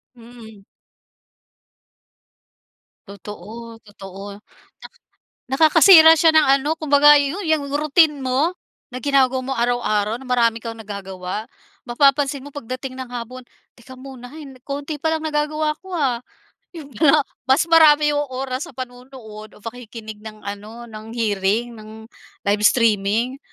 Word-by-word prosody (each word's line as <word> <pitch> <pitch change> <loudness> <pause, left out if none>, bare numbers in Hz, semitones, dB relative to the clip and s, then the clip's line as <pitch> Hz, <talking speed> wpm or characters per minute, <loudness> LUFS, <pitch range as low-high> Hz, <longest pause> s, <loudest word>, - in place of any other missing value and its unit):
Mm. 225 -4 -15 2.4
Totoo, 215 +4 -10
totoo. 200 0 -11 0.4
Na - - -10 0.7
Nakakasira 320 +1 +7
siya 320 0 +4
ng 315 -1 +4
ano 295 +3 -1
kumbaga 295 -1 +5
yu 285 +5 -2
yang 315 -3 0
routine 300 0 +2
mo, 265 +7 0 0.4
na 255 - -6
ginagawa 265 -1 +2
mo 270 - -4
araw-araw 230 -3 0
na - - -12
marami 230 -2 +1
kang 230 0 -7
nagagawa. 200 -2 -7 0.4
Mapapansin 275 +2 +2
mo - - -9
pagdating 255 0 -7
ng 260 -1 -7
hapon, 245 +1 -7 0.3
"Teka 255 +2 -14
muna 255 -2 -11
hay 310 0 -10 0.2
konti 285 +2 -5
palang 320 0 -1
nagagawa 305 0 -1
ko 380 0 -13
ah." 255 -6 0 0.6
Yun 295 -4 -10
nga 285 +5 +3 0.2
mas 265 +2 +4
marami 300 -2 +6
yung 290 0 0
oras 260 +4 -4
sa - - -15
panonood 255 +1 -9 0.4
o - - -17
pakikinig 225 -2 -9
ng 215 -1 -12
ano 210 +4 -8
ng 220 0 -11
hearing, 215 +1 -1
ng 220 0 -12 0.4
live 205 +1 0
streaming. 230 +3 +1
255 Hz, 130 wpm, -20 LUFS, 220-290 Hz, 2.4 s, Nakakasira